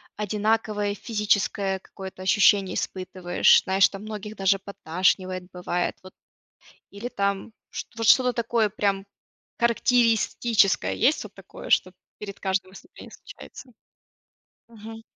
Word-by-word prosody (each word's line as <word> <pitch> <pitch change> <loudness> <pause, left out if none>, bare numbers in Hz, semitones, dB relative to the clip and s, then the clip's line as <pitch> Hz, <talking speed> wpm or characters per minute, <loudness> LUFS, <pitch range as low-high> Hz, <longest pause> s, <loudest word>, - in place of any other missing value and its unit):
одинаковое 210 0 -1
физическое 205 -3 0
какое-то 190 0 -10
ощущение 195 0 +3
испытываешь, 185 -1 +2
знаешь 190 0 +3
там 195 0 -9
многих 215 0 -7
даже 195 0 +2
подташнивает 185 0 -1
бывает. 180 0 -2
Вот, 185 - -13 0.6
э, - - -22 0.2
или 200 +4 -6
там, 200 -1 -2 0.4
вот 225 - -2
что-то 250 0 +5
такое 230 -2 +1
прям 200 -1 -1 0.5
характеристическое, 235 -3 +2
есть 270 +7 +2
вот - - -11
такое, - - -12
что - - +2 0.3
перед 200 -1 -8
каждым 190 -1 -2
испытанием - - -14
случается? 265 - -13 1.0
Мгм. 225 0 -11
200 Hz, 115 wpm, -25 LUFS, 190-220 Hz, 1.0 s, что-то